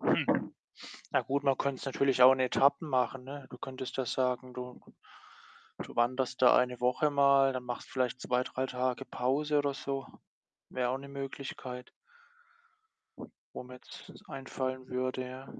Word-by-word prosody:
Hm. - - +1 0.6
Ja - - +4
gut, 140 +1 -1
man 135 -1 +4
könnte 140 -2 -1
es - - -7
natürlich 135 -1 +1
auch 130 +1 +10
in 130 - 0
Etappen 140 +4 +3
machen, 130 -1 +1
ne? 140 0 -8
Du 125 - -10
könntest 130 0 -6
ja 130 - 0
sagen, 125 0 -1
du 125 0 -7 1.0
du - - -7
wanderst 130 +2 +1
da 125 - +8
1 125 -1 +2
Woche 125 +5 +2
mal, 140 -1 +5
dann 130 -1 -4
machst 120 -1 -5
vielleicht 130 -2 -1
2, 125 0 +1
3 130 +1 -2
Tage 125 +1 -1
Pause 145 +4 0
oder 145 -1 0
so. 135 -1 -4 0.6
Wäre 125 -1 -1
auch 130 - -1
'ne 140 +1 -10
Möglichkeit 135 -2 -6 1.6
wo - - -5
mir 125 0 -11
jetzt 125 - -12 0.2
einfallen 130 -1 -4
würde, 130 0 -2
ja. 130 +1 -8
130 Hz, 160 wpm, -31 LUFS, 125-135 Hz, 1.6 s, auch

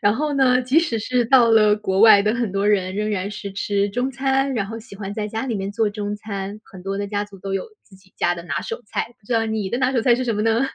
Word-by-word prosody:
然 205 +1 +3
后 300 +2 -1
呢， 255 -2 +3
即 260 +6 +3
使 305 -9 0
是 245 +2 0
到 240 -1 +5
了 215 -2 +5
国 190 -2 -1
外 215 -2 +8
的 215 +2 +1
很 235 -5 -2
多 200 +1 +1
人， 190 -3 +1
仍 210 +1 -1
然 200 0 -2
是 200 -1 -7
吃 200 0 0
中 245 +6 -2
餐， 270 0 0
然 200 -4 -1
后 225 +2 -6
喜 225 -1 -13
欢 200 0 -6
在 210 0 -3
家 220 +3 -4
里 235 - -2
面 195 0 -3
做 215 0 +1
中 205 0 -4
餐。 205 -1 -6
很 185 -2 -13
多 195 +1 -3
的 205 - -2
家 205 0 -2
族 200 -2 -14
都 195 +1 -5
有 - - -2 0.2
自 190 - -19
己 190 0 -25
家 175 - +1
的 170 - -8
拿 - - -2
手 460 0 -5
菜， 235 - -3
不 205 - -27
知 250 - -3
道 225 -1 +2
你 215 -3 -2
的 240 - -1
拿 260 0 +1
手 245 - +2
菜 240 0 +5
是 255 +1 -2
什 230 - -1
么 210 - -1
呢？ 225 +1 +2
210 Hz, 320 characters per minute, -21 LUFS, 200-240 Hz, 0.2 s, 外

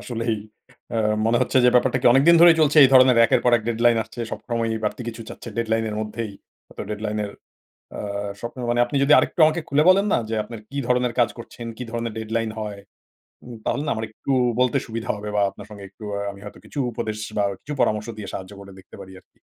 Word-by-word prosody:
আসলেই 115 -2 -2 0.5
অ্যা 115 - -2 0.3
মনে 115 - +3
হচ্ছে, 130 - 0
যে - - +7
ব্যাপারটা 125 +1 +3
কি - - +1
অনেক 135 - +5
দিন 170 - +8
ধরেই 170 -1 +8
চলছে, 150 0 +3
এই - - +6
ধরনের 130 -1 +7
একের - - +3
পর 125 - +4
এক 115 - -5
deadline 115 0 +3
আসছে? 120 - -11
সব - - -5
সময়ই 115 -1 -1
বাড়তি 105 - -2
কিছু 115 0 -7
চাচ্ছে - - -9
deadline 115 -1 0
এর 105 - -5
মধ্যেই? 110 0 -5 0.3
হয়তো - - -9
deadline 105 0 -3
এর 100 - -6 0.6
অ্যা 100 0 -5
স্বপ্ন 120 +2 -7
মানে 120 - +1
আপনি 140 - -4
যদি 150 - +4
আরেকটু - - -1
আমাকে 155 +2 0
খুলে 145 +2 +3
বলেন 195 +2 +5
না? - - +3
যে 115 - -2
আপনার 115 0 -9
কি 140 - -5
ধরনের 125 -1 +1
কাজ 120 - +4
করছেন, 115 0 -9
কি - - -5
ধরনের 115 -1 -3
deadline 110 0 -2
হয়? 105 -2 -5 0.7
উম 120 - -9
তাহলে 145 - -1
আমার 110 0 -3
একটু 125 +5 -6 0.3
বলতে 125 -1 +2
সুবিধা 115 0 -6
হবে 105 0 -6
বা 105 - +2
আপনার 100 - -12
সঙ্গে 105 -2 -10
একটু 100 +3 -16
আ - - -3
আমি 100 - -14
হয়তো 105 - -10
কিছু 145 - -7
উপদেশ, 110 -1 -4 0.2
বা 100 - +2 0.2
কিছু 150 - -6
পরামর্শ 105 +1 0
দিয়ে 105 - -7
সাহায্য 95 +1 -7
করে 100 0 -12
দেখতে 95 - -15
পারি 95 - -11
আরকি। - - -33
115 Hz, 225 wpm, -23 LUFS, 105-125 Hz, 0.7 s, দিন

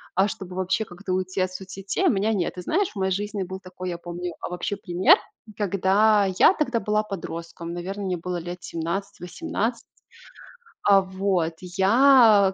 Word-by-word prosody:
а, 190 +2 +4
чтобы 185 -3 -7
вообще 190 +4 0
как-то 185 0 -6
уйти 185 0 -1
от 185 0 0
соцсетей, 195 - -3
у - - +6
меня 215 +1 +1
нет. 185 -5 -1
Ты 180 - -6
знаешь, 360 - 0
в - - -23
моей 190 0 0
жизни 205 +1 -2
был 190 +1 -7
такой, 185 -1 -7
я 175 - -4
помню, 175 0 -6
а, - - -4
вообще 180 +3 -3
пример, 200 - +4 0.4
когда- 205 +1 +3
я - - +7
тогда 255 -9 0
была 210 0 0
подростком, 170 -4 -6
наверно, 190 +4 -5
мне 185 -2 -1
было 180 +1 -4
лет 175 +1 -6
17-18 195 +6 -3 1.0
А 200 -1 +6
вот, 190 -3 -1
я 205 +2 +5
190 Hz, 170 wpm, -24 LUFS, 180-205 Hz, 1.0 s, я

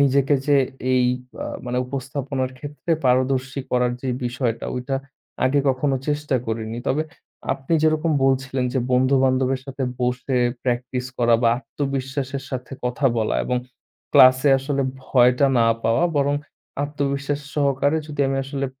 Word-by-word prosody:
নিজেকে 140 +1 +3
যে, 145 -1 +5 0.4
এই 125 -1 +4 0.4
আ - - -4 0.2
মানে 125 0 -1
উপস্থাপনার 135 0 -3
ক্ষেত্রে 145 +4 -4
পারদর্শী 130 +1 +1
করার 125 -1 +2
যে 130 - -3 0.2
বিষয়টা, 120 -2 -2
ওইটা 125 +2 -3 0.5
আগে 140 +2 +3
কখনো 135 +1 +1
চেষ্টা 145 -2 -1
করিনি। 110 0 -3
তবে, 145 +4 +1 0.5
আপনি 135 +5 -5
যেরকম 155 +1 +2
বলছিলেন 130 -1 +1
যে, 135 - +1
বন্ধুবান্ধবের 130 0 +3
সাথে 135 0 -5 0.2
বসে 125 +1 -1 0.3
প্র্যাকটিস 125 0 -2
করা 120 -1 +4
বা 115 - +5
আত্মবিশ্বাসের 135 0 -3
সাথে 130 0 -5
কথা 125 +3 +1
বলা 110 -1 0
এবং 125 - 0 0.6
ক্লাসে 130 +2 +7
আসলে 140 0 -1 0.2
ভয়টা 125 +2 +4
না 115 - +4 0.2
পাওয়া, 115 +9 +3
বরং 145 0 +2 0.5
আত্মবিশ্বাস 140 0 -2
সহকারে 140 +1 +2
যদি 145 -1 -4
আমি 135 - -1
আসলে 135 0 -3
135 Hz, 135 wpm, -22 LUFS, 125-140 Hz, 0.6 s, ক্লাসে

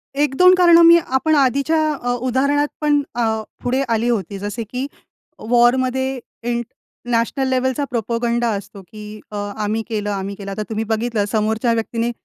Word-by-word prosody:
1-2 295 +6 +4
कारणं 345 -2 +6
मी 335 0 +8
आपण 310 0 0
आधीच्या 280 +3 +2 0.2
अ, 245 -4 -3
उदाहरणात 265 +4 +1
पण 295 -1 +3
अ, 220 -2 0 0.2
पुढे 255 +2 0
आली 230 +1 +1
होती. 200 -4 -2
जसे 205 +4 -4
की 250 +5 -5 0.6
वॉरमध्ये 255 +2 +2 0.2
इंट 240 0 -2 0.4
नॅशनल 235 +3 0
लेव्हलचा 260 +2 0
प्रोपगंडा 235 0 -1
असतो 200 0 -10
की 210 +3 -11
अ, - - -7 0.2
आम्ही 215 +1 -1
केलं, 210 -2 -2
आम्ही 200 0 -4
केलं. 195 0 -7
आता 210 +2 -3
तुम्ही 220 0 -2
बघितलं 220 -1 -1
समोरच्या 220 +2 +1
व्यक्तीने, 230 +1 -2
240 Hz, 150 wpm, -19 LUFS, 220-265 Hz, 0.6 s, मी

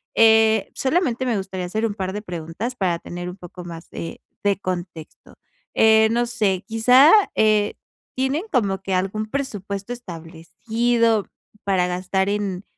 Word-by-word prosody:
Eh, 220 -1 +5
solamente 265 -4 0
me 240 -3 0
gustaría 190 -1 -4
hacer 215 +5 -1
un 205 -2 -2
par 190 -2 -3
de 210 - -4
preguntas, 180 +6 -5
para 185 -7 0
tener 175 0 -6
un 180 - -8
poco 175 0 -10
más 165 -1 -9
de 165 - -7 0.2
de 200 -1 +3
contexto. 175 -4 -7 0.4
Eh, 220 0 +5
no 240 +1 +1
sé, 205 -6 0
quizá, 250 +7 +6 0.2
eh, 215 -1 +3 0.4
¿tienen 265 +7 0
como 200 -7 0
que 190 -1 -3
algún 195 +4 -1
presupuesto 205 -6 -4
establecido 225 +4 -1 0.4
para 185 -2 +2
gastar 185 +2 -1
en, 200 -2 -2
205 Hz, 145 wpm, -22 LUFS, 180-230 Hz, 0.4 s, quizá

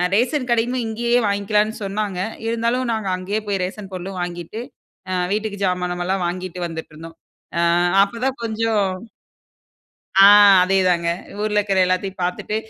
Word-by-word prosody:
Ration 255 +3 0
கடையுமே 240 +2 +1
இங்கேயே 235 +2 0
வாங்கிக்கலான்னு 210 +2 0
சொன்னாங்க. 200 -1 -3 0.3
இருந்தாலும் 235 +2 0
நாங்க 215 -3 -3
அங்கயே 185 +4 -3
போய் 195 -2 -1
ரேஷன் 195 +2 -6
பொருளும் 185 +1 -6
வாங்கிட்டு, 175 +5 -5 0.5
அ - - -1 0.2
வீட்டுக்கு 210 -1 -3
ஜாமானெல்லாம் 180 0 -1
வாங்கிட்டு 180 0 -5
வந்துட்ருந்தோம். 165 0 -9 0.4
அ - - +3 0.4
அப்ப 215 +4 -5
தான் 265 -1 -1
கொஞ்சம் 220 -2 0 1.3
ஆ. 195 - +9 0.4
அதேதாங்க. 180 -2 +2 0.3
ஊர்ல 210 0 0
இருக்குற 195 -2 +1
எல்லாத்தையும் 185 +1 -2
பாத்துட்டு. 180 +4 -2
200 Hz, 130 wpm, -21 LUFS, 180-220 Hz, 1.3 s, ஆ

